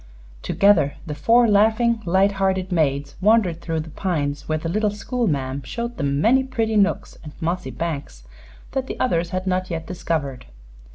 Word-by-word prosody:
Together 185 -8 +3
the 155 - -4
four 230 +11 +4
laughing, 220 +2 +3
light 190 +3 +3
hearted 190 -1 0
maids 140 -4 0
wandered 195 -5 +3
through 165 -2 -2
the 155 0 -6
pines, 145 -6 -2
where 155 - +1
the 155 - -5
little 210 +5 +1
school 235 +4 -2
ma'am 135 -3 -1
showed 235 - -5
them 140 -1 0
many 255 - +4
pretty 225 -4 -1
nooks 205 -1 +1
and 150 -1 -9
mossy 175 +3 -2
banks 140 - -5 0.5
that 260 -1 -2
the - - -6
others 170 -9 +1
had 185 +1 -3
not 185 0 -1
yet 165 -1 -4
discovered. 160 - -3
180 Hz, 170 wpm, -22 LUFS, 155-215 Hz, 0.5 s, four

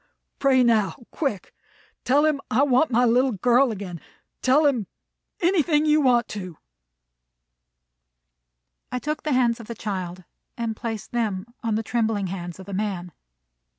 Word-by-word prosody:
"Pray 265 -2 +4
now, 220 -4 +2 0.2
quick. 270 - -3 0.5
Tell 285 +4 +4
him 300 -3 +1
I 255 +6 +3
want 270 +2 +3
my 245 0 +3
little 250 +2 +3
girl 245 +5 +3
again. 185 -5 -6 0.4
Tell 280 +4 +4
him 245 -9 +1 0.5
anything 335 -4 +3
you 305 0 +4
want 245 -3 +3
to." 185 -6 -7 2.3
I 250 - -1
took 300 +4 -3
the 305 - -2
hands 245 -2 +2
of 230 - -10
the 235 - -6
child, 185 -4 -5 0.3
and 230 -2 -2
placed 225 -2 -5
them 215 -5 -1 0.2
on 225 -3 -1
the 220 - -1
trembling 220 -3 0
hands 175 -2 -6
of 190 - -9
the 200 - -8
man. 190 -3 -3
235 Hz, 150 wpm, -24 LUFS, 205-265 Hz, 2.3 s, Pray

